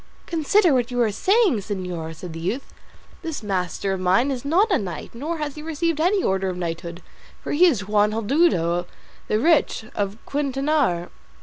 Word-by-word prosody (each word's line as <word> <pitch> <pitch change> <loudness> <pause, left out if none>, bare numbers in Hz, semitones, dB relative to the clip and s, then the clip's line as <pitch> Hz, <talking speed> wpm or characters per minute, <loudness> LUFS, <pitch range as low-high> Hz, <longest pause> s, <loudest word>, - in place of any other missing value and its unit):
"Consider 340 +2 +3
what 245 -2 +1
you 245 -1 -2
are 220 - +1
saying, 390 - +3
señor," 180 -5 -5
said 165 +1 -8
the 165 - -6
youth; 205 +11 -4 0.5
"this 325 -8 -5
master 195 0 -1
of 190 - -3
mine 190 +9 +2
is 255 -3 -4
not 365 +10 +2
a 370 - +3
knight, 180 -7 -6
nor 305 +8 -4
has 300 -2 -3
he 300 - -9
received 320 0 -1
any 370 +3 +2
order 190 0 +1
of 180 - -4
knighthood; 170 0 -5 0.4
for - - -4
he 350 +5 +5
is 215 - 0
Juan 210 0 +3
Haldudo 205 - +1 0.4
the 215 - +1
Rich, 295 -3 +2
of 200 0 -2
Quintanar." 275 - 0
230 Hz, 180 wpm, -23 LUFS, 185-310 Hz, 0.5 s, he